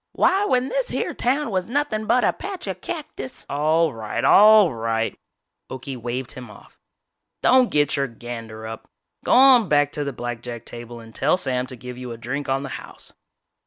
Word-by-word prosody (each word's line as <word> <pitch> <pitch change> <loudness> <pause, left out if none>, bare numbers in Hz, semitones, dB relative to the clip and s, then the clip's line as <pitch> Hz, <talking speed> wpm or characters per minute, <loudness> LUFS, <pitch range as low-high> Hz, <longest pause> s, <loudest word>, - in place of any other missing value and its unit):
Why 390 +2 +3
when 255 -7 +1
this - - -1
here - - -2
town 260 0 0
was 185 -2 -1
nothin' 240 -5 -1
but 250 - +3
a - - +2
patch 390 -2 -6
of 190 -2 -5
cactus 295 - -7
" - - -44
"All 155 +2 +2
right, 110 -2 -4
all 210 -5 +7
right," 115 0 -1 0.5
Okie 130 +1 -6
waved 120 +1 -4
him 125 -2 -9
off, 105 - -16 0.6
"don't 255 -1 +5
get 145 -1 +2
your 140 -1 0
gander 115 -2 -8
up! 110 0 -8 0.4
Go - - +2
on 250 -6 +7
back 145 -1 +3
to 150 - -3
the 140 - -3
blackjack 120 -1 -6
table 120 0 -9
and 115 -1 -13
tell 150 +9 +2
Sam 130 -6 -1
to 130 - -5
give 125 +1 -9
you 125 -1 -6
a 115 - -7
drink 135 +5 -4
on 135 +1 0
the 135 - -6
house." - - -13
140 Hz, 195 wpm, -23 LUFS, -, 0.6 s, all